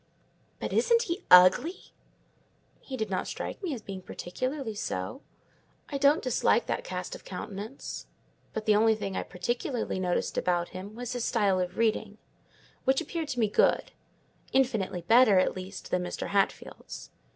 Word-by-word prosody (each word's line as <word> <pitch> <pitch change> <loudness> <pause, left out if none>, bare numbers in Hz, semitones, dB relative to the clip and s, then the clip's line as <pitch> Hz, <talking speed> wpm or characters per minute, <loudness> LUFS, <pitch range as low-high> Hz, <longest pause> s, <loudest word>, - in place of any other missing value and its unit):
"But - - -3
isn't 470 0 +4
he 360 -2 -4
ugly?" 185 - +6 0.9
"He 265 - -7
did 220 -3 -3
not 185 - -1
strike - - -5
me 365 -5 -2
as 225 - -9
being 190 -1 -6
particularly 255 +8 -4
so; 145 - -4 0.7
I 280 - -3
don't 285 +3 +4
dislike 255 - +2
that - - -2
cast - - -5
of - - -9
countenance: 215 - -7 0.4
but 220 -1 -4
the 215 -2 +5
only 220 +1 +4
thing 195 -3 -4
I - - 0
particularly 240 +3 -2
noticed 180 -1 0
about 175 -1 0
him 195 +3 -8
was 245 +1 -4
his 245 -2 -2
style 200 -6 +2
of 180 0 -3
reading; 220 -2 0 0.7
which 265 +1 +3
appeared 330 -2 -4
to 250 - -3
me 220 - +4
good—infinitely 215 -1 0
better, 225 +1 +6
at 185 - +3
least, 185 +1 -8
than 180 - +2
Mr. 180 - -4
Hatfield's. 200 -1 -2
220 Hz, 155 wpm, -29 LUFS, 185-265 Hz, 0.9 s, ugly